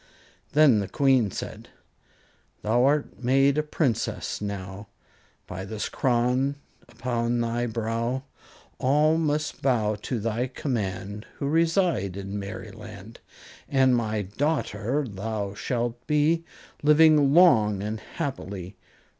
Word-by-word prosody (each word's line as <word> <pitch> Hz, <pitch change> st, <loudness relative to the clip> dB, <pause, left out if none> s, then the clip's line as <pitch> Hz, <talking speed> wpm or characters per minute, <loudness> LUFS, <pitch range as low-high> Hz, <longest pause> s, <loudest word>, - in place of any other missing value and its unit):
Then 145 Hz, -7 st, +6 dB
the 100 Hz, -, -2 dB
Queen 130 Hz, 0 st, +3 dB
said: -, -, -7 dB, 0.9 s
Thou 120 Hz, +4 st, +3 dB
art 145 Hz, -2 st, 0 dB
made 135 Hz, +3 st, +3 dB
a -, -, +4 dB
Princess 150 Hz, -9 st, -2 dB
now 100 Hz, 0 st, -6 dB, 0.6 s
By 95 Hz, +1 st, -6 dB
this 105 Hz, +2 st, -4 dB
crown 125 Hz, +2 st, +1 dB, 0.3 s
upon 120 Hz, -1 st, -1 dB
thy 120 Hz, +1 st, -1 dB
brow; 115 Hz, +3 st, -2 dB, 0.6 s
All 150 Hz, +4 st, +3 dB
must 150 Hz, -1 st, -1 dB
bow 115 Hz, -6 st, +2 dB
to 110 Hz, +4 st, -4 dB
thy 115 Hz, +3 st, -1 dB
command, 105 Hz, -6 st, -4 dB
Who 140 Hz, -, -3 dB
reside 165 Hz, -, +1 dB
in 100 Hz, +1 st, -5 dB
Merryland; 105 Hz, +1 st, -9 dB, 0.5 s
And 130 Hz, -2 st, +4 dB
my 110 Hz, -3 st, -1 dB
daughter 130 Hz, +2 st, -1 dB
thou 100 Hz, -1 st, -4 dB
shalt 120 Hz, +2 st, -3 dB
be, 155 Hz, +2 st, +2 dB, 0.4 s
Living 150 Hz, -1 st, +5 dB
long 110 Hz, -, +5 dB
and 110 Hz, +1 st, -3 dB
happily. 100 Hz, -, -6 dB
120 Hz, 115 wpm, -26 LUFS, 105-140 Hz, 0.9 s, Then